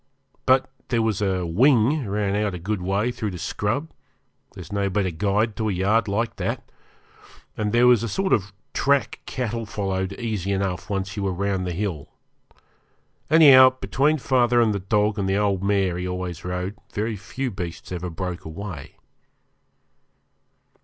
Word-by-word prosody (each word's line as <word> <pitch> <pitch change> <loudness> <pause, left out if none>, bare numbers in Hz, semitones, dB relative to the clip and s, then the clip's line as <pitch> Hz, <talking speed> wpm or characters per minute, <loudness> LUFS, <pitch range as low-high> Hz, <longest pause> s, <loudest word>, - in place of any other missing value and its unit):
But 130 0 +4 0.2
there 115 -2 +1
was 110 -3 0
a 95 -3 0
'wing' 125 - +3
ran 100 0 -1
out 105 -2 0
a - - -4
good 95 +3 -3
way 100 +6 0
through 110 -3 -3
the 90 - -6
scrub 115 - -2 0.6
there's 85 -3 -10
no 100 -1 0
better 95 -1 0
guide 105 +6 0
to 110 -1 0
a - - 0
yard 100 +5 +1
like 115 +3 -1
that - - -3 0.9
and 105 -1 -1
there 120 +2 +4
was 125 -3 +6
a 115 - -2
sort 190 - 0
of 100 -1 +1 0.2
track 140 0 +1
cattle 115 -3 -3
followed 95 -2 -2
easy 105 -4 -3
enough 95 0 -2
once 95 0 -3
you 105 - -3
were 100 -1 0
round 95 0 -1
the - - -2
hill. 85 -5 -3 1.2
Anyhow, 135 -5 +8
between 150 +3 +1
father 125 -3 +2
and 115 -3 +3
the 100 - -2
dog 105 +2 +1
and 95 -1 0
the 95 - +2
old 100 -2 +1
mare 95 -3 +1
he 90 - -3
always 90 -2 -4
rode, 90 +2 -3 0.2
very 110 +2 -2
few 125 +6 -4
beasts 90 -4 -7
ever 90 0 -4
broke 90 +1 -5
away. 85 -2 -8
100 Hz, 165 wpm, -24 LUFS, 95-115 Hz, 1.2 s, Anyhow